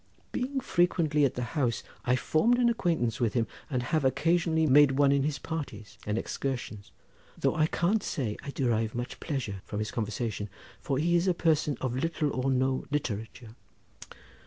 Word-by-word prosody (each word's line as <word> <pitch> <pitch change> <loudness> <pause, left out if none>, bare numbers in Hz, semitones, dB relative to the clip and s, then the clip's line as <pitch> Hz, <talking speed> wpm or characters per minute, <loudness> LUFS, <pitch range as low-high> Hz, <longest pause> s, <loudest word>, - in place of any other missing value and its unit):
Being 265 +2 -2
frequently 170 - +2
at 135 - 0
the 125 - -2
house 130 -7 0 0.2
I 125 - +3
formed 220 - +2
an 245 -1 +4
acquaintance 165 - 0
with 115 -2 0
him, 115 -2 +2 0.2
and 125 -4 -1
have 155 +4 0
occasionally 160 +3 +2
made 145 -1 +6
one 140 0 +4
in 140 0 +3
his 145 +1 -1
parties 135 -11 -6
and 105 +1 0
excursions, 120 -5 -4 0.5
though - - +1
I 155 0 +3
can't 190 +7 +1
say 115 - -2
I - - -7
derive 115 -5 0
much 120 +1 -4
pleasure 120 - -3
from 105 - -6
his 110 +1 -2
conversation, 110 -2 -3 0.3
for 135 - -1
he 170 +4 +2
is 175 +2 +2
a 180 - +3
person 155 -5 +1
of 130 -2 -1
little 150 +1 0
or 130 +1 -1
no 130 0 +1
literature." 115 -4 -4
135 Hz, 175 wpm, -29 LUFS, 120-160 Hz, 0.5 s, made